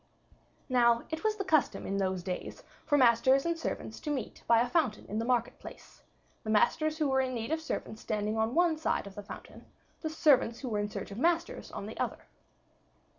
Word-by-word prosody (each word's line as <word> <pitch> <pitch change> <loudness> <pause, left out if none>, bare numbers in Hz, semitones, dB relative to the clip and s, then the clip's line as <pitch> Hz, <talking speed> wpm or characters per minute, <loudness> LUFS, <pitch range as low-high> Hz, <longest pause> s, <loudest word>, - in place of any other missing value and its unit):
Now, 235 -2 +4
it 320 0 -4
was 435 -1 +2
the 400 - -3
custom 315 -7 +1
in 195 - -2
those 190 -2 -1
days 180 0 -5 0.2
for 290 - +4
masters 260 +2 +5
and 335 0 +1
servants 330 - -5
to 300 - -5
meet 265 -7 -3
by 230 -1 +6
a 240 - +2
fountain 250 -6 0
in 215 - -3
the 225 - -1
market 240 -2 0
place, - - -12 0.4
the 215 - -5
masters 310 +9 +2
who 305 -2 +1
were 265 -1 +3
in 255 -1 -2
need 230 +4 -4
of 320 0 0
servants 220 -8 -5
standing 210 0 -1
on 220 +2 0
one 340 -2 +3
side 315 - 0
of 200 - -9
the 205 - -7
fountain, 200 - -11 0.3
the 315 - -2
servants 270 -7 +3
who 260 - -4
were 210 -2 -1
in 205 0 -1
search 205 - -6
of 200 - -6
masters 340 - 0
on - - -6
the - - -8
other. - - -3
250 Hz, 215 wpm, -31 LUFS, 220-315 Hz, 0.4 s, by